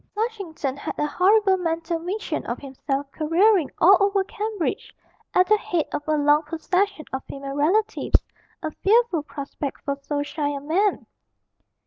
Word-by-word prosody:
Flushington 395 - -3
had - - -5
a 295 - +1
horrible 385 +5 +3
mental 330 -1 -2
vision 375 +6 -3
of - - -2
himself 275 0 -4
careering 340 +1 +3
all 385 +3 +7
over 400 -1 +2
Cambridge 420 -2 -3 0.4
at 365 - +6
the 425 +2 +4
head 340 -6 -1
of - - -1
a 310 0 +2
long 295 +1 +4
procession 335 +2 -1
of 265 - -3
female 275 0 -7
relatives, 385 +10 +2 0.4
a 310 - -2
fearful 420 -2 +2
prospect 280 -1 -6
for 280 - 0
so 285 0 -2
shy 290 0 -2
a 285 -1 -3
man. 360 +8 0
330 Hz, 150 wpm, -24 LUFS, 290-400 Hz, 0.4 s, all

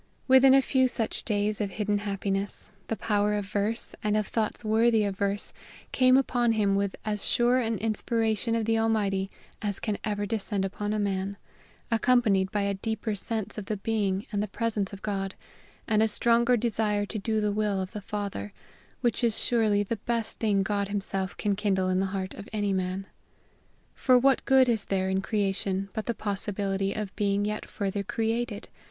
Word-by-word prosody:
Within 265 0 +7
a 270 - +5
few 260 -1 +3
such 230 -3 -2
days 210 -1 0
of 205 - -1
hidden 205 +2 -1
happiness, 200 0 -2 0.2
the 225 - -1
power 210 -1 +1
of 205 -1 -2
verse, 205 +3 -1
and 210 0 +2
of 215 - +1
thoughts 220 +1 -2
worthy 220 0 +4
of 200 -1 -1
verse, 200 +1 -1 0.4
came 255 0 +5
upon 245 -3 +2
him 205 -3 +2
with 200 0 0
as 210 -1 -1
sure 245 +1 +3
an 225 -2 0
inspiration 225 +1 0
of 225 -1 0
the 225 0 +2
Almighty 200 -4 +1 0.3
as 205 -2 -2
can 210 -3 -2
ever 205 -1 -1
descend 205 -2 -1
upon 205 +2 -3
a 215 - 0
man, 200 -1 -1 0.5
accompanied 225 -5 +3
by 205 -2 0
a 200 0 0
deeper 220 +2 -3
sense 215 +1 -4
of 205 - -7
the 210 +1 -2
being 200 -2 -1
and 205 -1 0
the 210 - -1
presence 210 -1 -2
of 200 -1 -10
God, 195 -2 -2 0.5
and 215 -2 +3
a 220 - +4
stronger 235 +2 +3
desire 210 -2 0
to 215 +1 -5
do 220 +1 0
the 210 -1 +1
will 205 -1 0
of 185 0 -4
the 210 - -6
Father, 200 - -4 0.5
which 240 0 0
is 230 -2 +2
surely 215 -4 +2
the 225 +3 -3
best 230 +1 -2
thing 205 -3 +2
God 200 0 -1
himself 195 -2 -3
can 205 -1 0
kindle 190 -2 +1
in 185 0 +2
the 195 - +1
heart 190 0 -4
of 205 - -10
any 205 -2 0
man. 185 +1 -2 0.9
For 255 -2 +4
what 270 +2 +3
good 265 -1 +5
is 225 -4 +1
there 190 -1 0
in 190 0 +1
creation 195 -2 -1
but 220 - -4
the 235 - 0
possibility 195 -1 -2
of 205 -1 -4
being 200 0 +1
yet 210 0 -3
further 200 -1 -2
created? 225 +1 -2
210 Hz, 190 wpm, -28 LUFS, 195-225 Hz, 0.9 s, Within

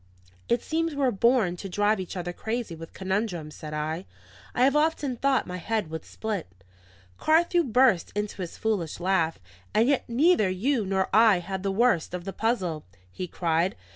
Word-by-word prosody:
"It 235 0 +2
seems 330 0 -1
we 285 - -2
were 260 -2 +3
born 215 -4 +2
to 195 - -7
drive 205 +3 +2
each 185 +1 -5
other 175 0 -4
crazy 225 -1 -3
with 165 0 -9
conundrums," 190 -5 -2
said 155 - -8
I. 155 +4 -3 0.5
"I 245 - +3
have 275 +2 +4
often 300 -3 +1
thought 270 +2 +1
my 180 0 -5
head 210 -2 -2
would 160 - -5
split." 215 -5 -4 0.7
Carthew 340 +2 +3
burst 250 - +3
into 210 -1 -3
his 175 - -6
foolish 195 -9 -1
laugh. 175 -3 +1 0.4
"And 225 +3 +4
yet 280 -1 +2
neither 255 - +4
you 215 +4 0
nor 190 0 +1
I 220 -3 +6
had 190 +2 -4
the 195 0 -1
worst 195 -5 +2
of 180 -1 -6
the 195 - -4
puzzle," 190 -9 -1 0.3
he 180 - -5
cried. 170 +2 0
200 Hz, 180 wpm, -26 LUFS, 175-245 Hz, 0.7 s, I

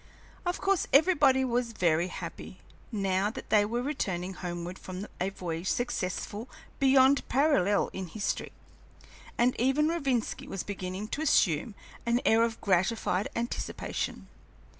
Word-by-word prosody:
Of 355 - -1
course 390 -2 +1
everybody 280 -4 +5
was 240 -1 -1
very 170 -3 +2
happy, - - -7 0.3
now 195 -2 +1
that 220 - -9
they 210 -1 +6
were 235 +3 -2
returning 190 -10 -2
homeward 175 0 -5
from 185 +2 -6
a 185 - 0
voyage 175 -2 -5
successful 220 -1 -2 0.3
beyond 270 0 +5
parallel 245 - +3
in 190 -1 -5
history, 200 +4 -3 0.9
and 245 +1 +3
even 270 +5 +3
Rovinski 275 -8 -1
was 195 - -4
beginning 190 0 -5
to 295 - -3
assume 200 - +2 0.3
an 235 +1 +2
air 225 +1 +5
of 230 -1 0
gratified 190 +1 +1
anticipation. 235 +1 -3
220 Hz, 130 wpm, -29 LUFS, 185-260 Hz, 0.9 s, they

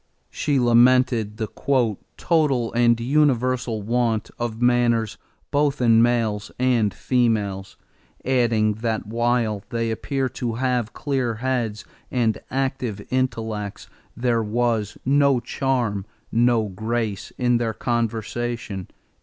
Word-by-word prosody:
She 145 -3 0
lamented 120 -2 +4
the 110 - -1 0.8
"total 145 -8 +2
and 120 0 +3
universal 125 -4 +1
want 115 -1 0
of 115 -2 -3
manners 120 -2 +2 0.3
both 145 0 +1
in 115 -2 +5
males 115 -3 +1
and 125 -5 +2
females," 105 -3 -1 0.5
adding 115 -5 +2
that 115 -3 -1
while 115 -2 0
"they 115 -1 -1
appear 135 +4 -1
to 120 -2 -3
have 125 -2 -1
clear 130 -5 -1
heads 120 -3 -2 0.2
and 115 -4 0
active 130 -6 -2
intellects," 115 -5 -2 0.3
there 120 -1 +1
was 110 -1 -1
"no 140 -1 +4
charm, 120 -5 -1 0.2
no 115 -1 +3
grace 110 +1 -3
in 120 -1 +2
their 115 -2 -2
conversation." 115 -3 -2
120 Hz, 110 wpm, -23 LUFS, 110-125 Hz, 0.8 s, in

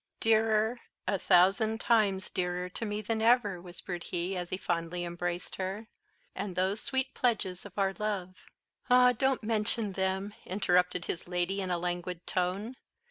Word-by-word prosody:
"Dearer 220 +1 +3 0.3
a 195 - +1
thousand 215 +7 +4
times 205 -6 +2
dearer 180 0 -1
to 225 - -4
me 210 +1 -3
than 220 +1 -1
ever," 220 -6 +3
whispered 175 0 -7
he, 180 +2 -2
as 175 -1 -3
he 185 - -2
fondly 175 -1 -2
embraced 175 +1 -4
her, 195 +4 -3 0.5
"and 190 -3 -4
those 190 +4 +1
sweet 265 -1 -1
pledges 200 -6 0
of 200 - -19
our 195 -1 +2
love!" 200 -4 -2 0.6
"Ah, 250 0 +7
don't 265 +1 +1
mention 215 -1 0
them," 190 +2 -1
interrupted 180 -2 +1
his 170 - -4
lady 180 +2 -1
in 185 - -3
a 175 - +1
languid 175 0 -3
tone. 195 +7 -2
190 Hz, 155 wpm, -30 LUFS, 180-220 Hz, 0.6 s, Ah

